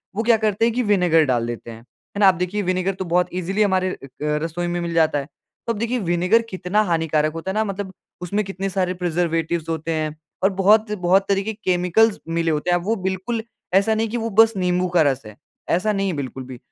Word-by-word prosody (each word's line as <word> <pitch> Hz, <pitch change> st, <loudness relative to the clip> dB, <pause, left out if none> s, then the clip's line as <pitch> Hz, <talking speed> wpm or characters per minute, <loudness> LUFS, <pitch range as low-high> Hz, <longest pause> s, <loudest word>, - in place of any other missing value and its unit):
वो 220 Hz, -, -1 dB
क्या 230 Hz, -1 st, +4 dB
करते 215 Hz, 0 st, +1 dB
हैं 230 Hz, -, +1 dB
की 250 Hz, +2 st, 0 dB
विनेगर 180 Hz, -6 st, +3 dB
डाल 120 Hz, -4 st, 0 dB
देते 120 Hz, 0 st, -6 dB
हैं, 110 Hz, -, -10 dB
है 125 Hz, +10 st, -13 dB
ना? 200 Hz, -, +6 dB
अब 180 Hz, -, +1 dB
देखिए 180 Hz, +4 st, -1 dB
विनेगर 185 Hz, 0 st, 0 dB
तो 190 Hz, -, -5 dB
बहुत 180 Hz, +1 st, +2 dB
ईजिली 185 Hz, +3 st, -1 dB
हमारे 185 Hz, -2 st, +1 dB
अ, -, -, -8 dB, 0.3 s
रसोई 160 Hz, +3 st, -1 dB
में 175 Hz, 0 st, -2 dB
मिल 170 Hz, 0 st, -3 dB
जाता 160 Hz, -3 st, +3 dB
है। 140 Hz, -, -6 dB, 0.4 s
तो 230 Hz, -, +1 dB
अब 210 Hz, -, -7 dB
देखिए 235 Hz, +2 st, -1 dB
विनेगर 180 Hz, +4 st, +2 dB
कितना 185 Hz, +2 st, 0 dB
हानिकारक 160 Hz, -4 st, 0 dB
होता 165 Hz, +3 st, -4 dB
है -, -, -4 dB
ना, 220 Hz, -, +2 dB
मतलब 195 Hz, -1 st, -5 dB, 0.3 s
उसमें 200 Hz, +4 st, -1 dB
कितने 195 Hz, 0 st, -4 dB
सारे 185 Hz, -1 st, -1 dB
प्रिजर्वेटिव्स 170 Hz, -2 st, -1 dB
होते 165 Hz, 0 st, -2 dB
हैं 155 Hz, -1 st, -2 dB, 0.3 s
और 195 Hz, -, +5 dB
बहुत, 210 Hz, +3 st, +3 dB
बहुत 190 Hz, -1 st, +2 dB
तरह 195 Hz, -1 st, +2 dB
के 220 Hz, +2 st, -3 dB
केमिकल्स 195 Hz, +2 st, +2 dB
मिले 165 Hz, 0 st, 0 dB
होते 150 Hz, +3 st, -1 dB
हैं, 175 Hz, -, +4 dB
अब 175 Hz, -, -6 dB
वो 225 Hz, +3 st, +1 dB
बिल्कुल 190 Hz, +4 st, -3 dB, 0.3 s
ऐसा 200 Hz, +4 st, +4 dB
नहीं 225 Hz, +1 st, 0 dB
है -, -, -10 dB
कि 240 Hz, -, -1 dB
वो 230 Hz, 0 st, -2 dB
बस 225 Hz, 0 st, +7 dB
नींबू 180 Hz, 0 st, +1 dB
का 170 Hz, -, +6 dB
रस 135 Hz, -3 st, +2 dB
है, 105 Hz, -1 st, -11 dB, 0.3 s
ऐसा 190 Hz, +5 st, +2 dB
नहीं 195 Hz, -1 st, 0 dB
है, 185 Hz, -, -1 dB
बिल्कुल 135 Hz, -1 st, -5 dB
भी। 130 Hz, 0 st, -9 dB
185 Hz, 240 wpm, -22 LUFS, 165-205 Hz, 0.4 s, बस